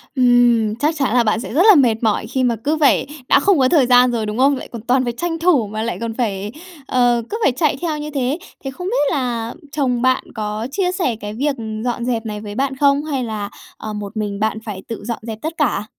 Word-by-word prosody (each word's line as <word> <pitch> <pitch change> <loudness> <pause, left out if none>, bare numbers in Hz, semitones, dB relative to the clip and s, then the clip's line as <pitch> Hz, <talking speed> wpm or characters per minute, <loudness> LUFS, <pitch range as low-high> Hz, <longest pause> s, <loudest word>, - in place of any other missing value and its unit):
Ừm, 245 -4 +4
chắc 300 +6 0
chắn 270 -5 0
là 245 -1 +4
bạn 215 0 +1
sẽ 245 - -6
rất 320 - +3
là 415 - +9
mệt 240 -6 +3
mỏi 215 -2 +1
khi 260 -1 -1
mà 240 -2 +2
cứ 310 +2 +1
phải 285 -2 +3 0.2
đã - - +6
không 385 -7 +3
có 255 - +4
thời 285 -5 +4
gian 250 0 +5
rồi, 225 -2 -1
đúng 210 +2 -4
không? 275 +2 +4
Lại - - -8
còn 230 -3 -7
toàn 255 +3 +2
phải 240 - -2
tranh 330 +5 -3
thủ 315 - +3
mà 215 +1 -4
lại 230 - -3
còn 230 -1 -3
phải, 210 -4 -2 0.4
ờ, 245 -2 +2
cứ 440 - -3
phải - - +4
chạy 295 +4 0
theo 320 -3 -1
như 300 0 -5
thế. 275 +2 -1 0.3
Thế 270 - -4
không 360 +7 -6
biết 385 - +1
là 240 -5 -2 0.2
chồng 255 -5 0
bạn 255 0 +2
có 215 +2 -3
chia 360 +1 0
sẻ 350 - -1
cái 210 -1 -7
việc 280 +4 -1 0.3
dọn 240 -1 -2
dẹp 235 -2 -1
này 210 -1 -5
với 205 -1 -7
bạn 270 +1 -1
không? 280 +1 +3
Hay 275 -5 -2
là, 210 -3 -4 0.3
ờ, 215 -1 -6
một 210 +1 -6
mình 205 -2 -3
bạn 220 0 0
phải 195 -3 -6
tự 230 -3 -6
dọn 235 -2 -3
dẹp 220 -2 -5
tất 320 +2 -3
cả? 245 -8 0
245 Hz, 255 wpm, -19 LUFS, 220-280 Hz, 0.4 s, là